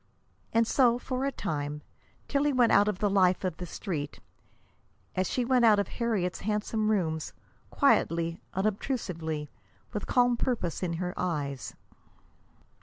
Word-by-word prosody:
And 230 0 +3
so, 240 0 +4
for 255 +1 -3
a 275 - 0
time, 150 - -4 0.4
Tillie 290 0 +1
went 245 -3 +4
out 205 +1 +5
of 210 -3 0
the 205 - +1
life 190 -2 +3
of 180 -4 -2
the 180 - -6
Street 155 -5 -4 1.0
as 185 0 0
she 250 - 0
went 250 -1 +3
out 220 -3 +7
of 200 - 0
Harriet's 215 -7 -1
handsome 215 +1 -1
rooms, 160 -7 0 0.4
quietly, 165 +1 +2
unobtrusively, 185 - -2 0.5
with 210 - -3
calm 245 -1 +3
purpose 230 -10 -1
in 175 -2 -1
her 180 +1 -3
eyes. 145 -7 -3
195 Hz, 140 wpm, -29 LUFS, 170-235 Hz, 1.0 s, out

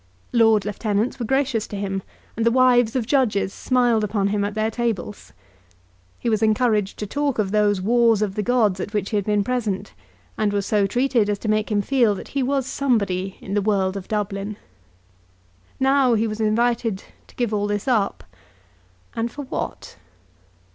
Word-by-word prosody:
Lord 225 -3 +4
Lieutenants 210 +3 -1
were 235 - -3
gracious 265 -4 0
to - - -7
him, 195 -1 -3 0.3
and 225 - -1
the 230 - +4
wives 245 -1 +4
of 250 -4 0
judges 220 -7 +1
smiled 245 -4 +1
upon 200 -1 0
him 205 0 0
at 205 +1 -3
their 220 +1 0
tables. 225 -5 -3 0.9
He - - -5
was 220 -2 +1
encouraged 215 -2 +1
to 210 - -4
talk 285 +5 -1
of 200 -3 0
those 205 -2 +2
wars 230 0 +3
of 200 -2 -2
the 210 - -2
gods 215 -4 +2
at 205 +3 -5
which 200 -2 -1
he - - -1
had 200 - -1
been 210 -1 +1
present, 210 -5 -2 0.5
and 210 -2 +1
was 200 -1 -1
so 205 -2 +2
treated 245 -1 +1
as 205 - 0
to 215 - -7
make 215 0 0
him 205 -1 +1
feel 235 -4 +2
that - - -9
he 275 - -1
was 270 0 0
somebody 200 -9 -1
in 195 - -6
the 205 - +2
world 195 -2 +1
of 195 -2 -6
Dublin. 205 -1 -3 1.2
Now 265 -2 +3
he 220 +1 +1
was 215 0 -3
invited 225 -1 +1 0.2
to - - -20
give 240 -3 -1
all 205 0 0
this 205 +3 -3
up; 220 -6 +1 0.9
and 230 +1 -2
for 290 - -7
what? 260 - -6
215 Hz, 185 wpm, -22 LUFS, 205-240 Hz, 1.2 s, Lord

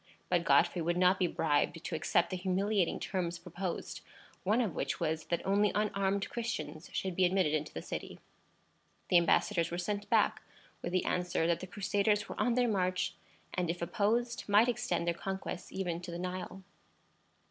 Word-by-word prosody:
But - - +2
Godfrey 175 - +4
would 170 +2 0
not 185 +1 +4
be 180 - +3
bribed 160 +1 0
to - - -5
accept 160 - +1
the - - -1
humiliating 190 +1 +1
terms 175 -3 -2
proposed; 175 +1 -5 0.4
one 210 +5 +2
of 220 -9 0
which 135 - -2
was, 160 +1 -1
that 170 - -2
only 200 +1 +3
unarmed 200 -1 +1
Christians 165 -9 -4
should 190 -2 -2
be 190 - +3
admitted 180 -4 +3
into 155 0 -1
the - - -6
city. - - -6 0.9
The 180 - +6
embassadors 170 0 +3
were 175 - -3
sent 205 +3 -3
back - - +3 0.4
with 175 - -3
the 185 0 +1
answer 175 -2 0
that 170 -1 +2
the 185 - -7
Crusaders 205 +2 +1
were - - -4
on 245 -2 +2
their 250 -1 +3
march, 185 -4 0 0.4
and, 180 -2 -1
if 170 +1 -2
opposed, 230 +7 0
might 210 +4 +6
extend 180 -8 0
their 170 - +1
conquests 190 0 -5
even 175 -3 -2
to 180 - -8
the 170 - -4
Nile. 185 +1 -5
185 Hz, 180 wpm, -32 LUFS, 170-200 Hz, 0.9 s, The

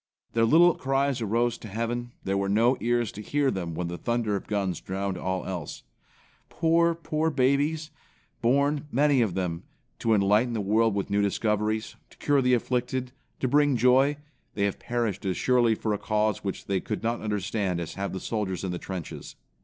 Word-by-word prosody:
Their 115 0 +3
little 170 +7 +6
cries 135 -1 0
arose 115 +2 0
to - - -9
heaven, 115 +3 -3
there 95 - -1
were 100 0 0
no 115 +6 +4
ears 120 -1 0
to 105 - -8
hear 140 +4 +1
them 85 -4 -4
when 90 0 -2
the 85 0 -5
thunder 120 -3 0
of 100 - -5
guns 100 -3 -1
drowned 95 0 -3
all 95 0 -3
else. 90 -6 -5 0.7
Poor, 170 0 +2
poor 160 -1 -1
babies! 150 +3 +1 0.5
Born, 140 +4 +2
many 140 0 +3
of 105 -7 0
them, 90 -3 -2 0.4
to 115 -1 +2
enlighten 105 +4 +3
the 110 - -1
world 110 +2 +2
with 100 -1 -2
new 100 0 +2
discoveries, 105 +2 -1
to - - -20
cure 145 -2 +2
the 125 -1 +4
afflicted, 125 +1 -2 0.3
to 130 - +1
bring 145 0 +3
joy, 130 +4 +4 0.4
they 100 - 0
have 100 -1 -1
perished 115 -5 -2
as 95 -2 -1
surely 120 -3 +3
or 110 - +2
a 105 - -2
cause 105 -1 0
which 100 -2 -4
they 100 -1 0
could 105 +1 -5
not 115 +1 -1
understand 105 -3 -1
as 85 -3 -5
have 100 0 -3
the 95 - -4
soldiers 100 -5 -3
in 95 - -2
the 90 - -4
trenches. 95 -4 -7
115 Hz, 190 wpm, -27 LUFS, 100-130 Hz, 0.7 s, little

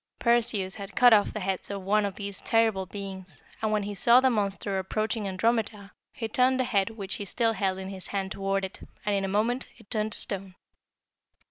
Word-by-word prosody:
Perseus 225 -5 +2
had 200 -2 -8
cut 245 -2 +7
off 205 -2 +4
the 215 - -5
heads 190 0 -2
of 200 -1 -5
one 205 +2 +2
of 195 - -7
these 200 -2 -5
terrible 220 -4 +2
beings, 190 -5 -8 0.2
and 220 -1 0
when 210 -1 +1
he 205 +1 -4
saw 235 +5 +6
the 260 0 +3
monster 200 -2 -1
approaching 215 +2 -2
Andromeda, 210 +1 -1 0.2
he 240 -6 -4
turned 255 +3 +2
the - - +3
head 200 -5 +1
which 205 -3 -5
he - - -4
still 225 +3 +1
held 195 -3 -1
in 190 0 -6
his 190 -1 -8
hand 195 -1 -3
toward 195 0 -1
it, 190 - -9 0.3
and 210 - +1
in 195 -1 +1
a - - -1
moment 225 +6 0
it 225 -4 -20
turned 215 -2 0
to - - -3
stone. 195 -2 -1
200 Hz, 215 wpm, -27 LUFS, 195-225 Hz, 0.3 s, cut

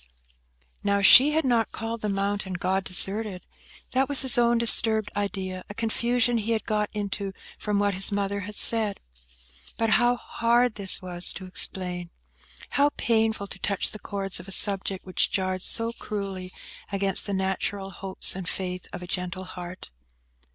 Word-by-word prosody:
Now, 200 0 +1
she 270 +9 +8
had 320 -1 +1
not 235 -3 +1
called 225 +1 -5
the 210 - -2
mountain 200 -1 -2
God 185 +2 -1
deserted. 195 +1 +2 0.5
That 265 +1 +1
was 280 -1 +5
his 265 0 +4
own 240 -1 +3
disturbed 225 -2 +5
idea; 190 -2 -4
a 205 - -8
confusion 235 +1 0
he 225 +2 -1
had 220 - -2
got 210 -1 -1
into 200 -2 -4 0.3
from 210 -1 -1
what 205 0 +1
his 190 +2 +2
mother 200 0 -2
had 205 +2 -7
said. 220 -3 +2 0.8
But 225 -1 0
how 240 +2 +3
hard 240 0 +1
this 195 -3 -1
was 180 -1 +1
to 190 - -8
explain! 180 -1 0 0.6
How 285 +1 +3
painful 220 -3 0
to - - -9
touch 200 -2 0
the 215 - -5
chords 195 -2 -3
of - - -11
a - - -9
subject 195 -1 0
which 185 - +1
jarred 185 -1 -2
so 230 +4 -1
cruelly 195 -5 -6 0.4
against 195 0 +3
the 200 - -2
natural 190 +1 -2
hopes 190 0 -2
and 185 -2 -4
faith 180 -1 -4
of 180 - -8
a - - -9
gentle 180 0 -4
heart! 180 - -9
200 Hz, 165 wpm, -25 LUFS, 190-225 Hz, 0.8 s, she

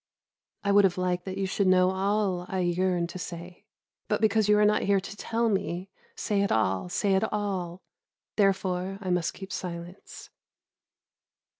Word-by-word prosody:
I 200 - +1
would 205 0 +6
have 190 -2 +2
liked 180 -1 -1
that 190 0 -5
you 195 - 0
should 190 +1 0
know 185 0 +5
all 190 -2 0
I 190 -1 -1
yearn 180 0 +1
to 175 +2 -8
say, 175 0 -8 0.4
but - - 0
because 220 -1 +2
you 210 - +6
are 210 - +5
not 210 0 +3
here 200 0 +3
to 195 +1 -8
tell 230 +2 -1
me, 190 -2 -2 0.2
"Say 205 -2 0
it, 200 - +1 0.4
say 200 0 +1
it 190 +3 +1
all," 190 -4 -3 0.5
therefore 190 -2 +1
I 185 -3 -3
must 180 -2 0
keep 190 0 -9
silence. 175 +1 -7
190 Hz, 165 wpm, -27 LUFS, 180-200 Hz, 0.5 s, would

